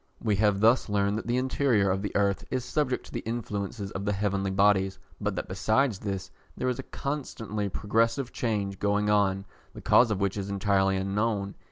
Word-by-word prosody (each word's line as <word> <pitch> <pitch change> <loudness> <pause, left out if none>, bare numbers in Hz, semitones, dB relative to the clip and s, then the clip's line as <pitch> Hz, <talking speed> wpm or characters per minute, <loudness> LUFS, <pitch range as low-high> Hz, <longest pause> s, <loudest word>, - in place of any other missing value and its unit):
We 105 -2 0
have 105 -1 +2
thus 115 +1 +4
learned 100 +1 +1
that 110 - -8
the 120 +1 +1
interior 125 -6 +2
of 95 +1 -1
the 100 - -4
earth 100 -1 +1
is 130 -1 -2
subject 130 -1 -1
to - - -13
the - - -3
influences 105 -3 -4
of 95 - -4
the 105 0 0
heavenly 100 -1 -1
bodies, 95 -1 +3 0.2
but - - -1
that - - -4
besides 110 +4 +1
this 95 -2 -4 0.3
there 130 - 0
is 125 - -2
a - - -8
constantly 110 -8 -3
progressive 115 +6 0
change 100 -4 -2
going 105 +1 +1
on, 100 -2 +2 0.3
the - - -8
cause 120 - +5
of 105 -3 -1
which 100 0 0
is 100 0 -4
entirely 95 -1 +2
unknown. 100 +1 -1
105 Hz, 195 wpm, -28 LUFS, 100-115 Hz, 0.3 s, cause